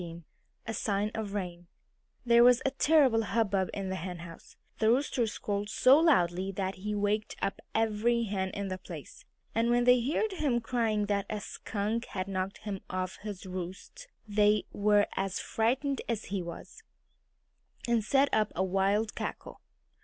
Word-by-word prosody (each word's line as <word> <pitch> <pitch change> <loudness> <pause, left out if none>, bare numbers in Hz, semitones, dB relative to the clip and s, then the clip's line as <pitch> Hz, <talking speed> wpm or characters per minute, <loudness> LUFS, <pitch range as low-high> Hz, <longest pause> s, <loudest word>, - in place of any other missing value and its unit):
XVII 170 -1 -8 0.4
A 225 - -4
SIGN 210 -1 -1
OF 215 -3 -4
RAIN 175 -3 -5 0.6
There 235 0 +6
was 245 0 +7
a 270 - +2
terrible 275 -5 +4
hubbub 205 -4 0
in 195 -1 -4
the 190 - -2
henhouse. 170 -1 -8 0.2
The 220 - +3
Rooster 250 -1 +2
squalled 205 -1 -3
so 260 +6 +6
loudly 190 - +3
that 190 0 -2
he 210 +3 -4
waked 205 +1 -1
up 195 - -2
every 225 +2 +2
hen 195 -3 -2
in 200 0 -4
the 185 0 -4
place. 165 -5 -10 0.3
And 230 +1 +1
when 240 0 +3
they 250 0 +5
heard 310 - 0
him 290 -10 0
crying 225 -3 0
that 200 -1 -1
a 210 - -2
skunk 215 +3 -3
had 185 0 -4
knocked 190 0 -3
him 200 -3 -4
off 185 0 -3
his 205 -2 -7
roost 185 - -7 0.2
they 210 0 +3
were 205 0 +3
as 195 0 -1
frightened 265 +5 0
as 225 -2 -2
he 195 - 0
was, 170 -1 -9 1.1
and 235 -2 +2
set 275 +5 +3
up 215 -1 +2
a 185 - +1
wild 195 +3 +1
cackle. - - -6
210 Hz, 165 wpm, -30 LUFS, 190-235 Hz, 1.1 s, was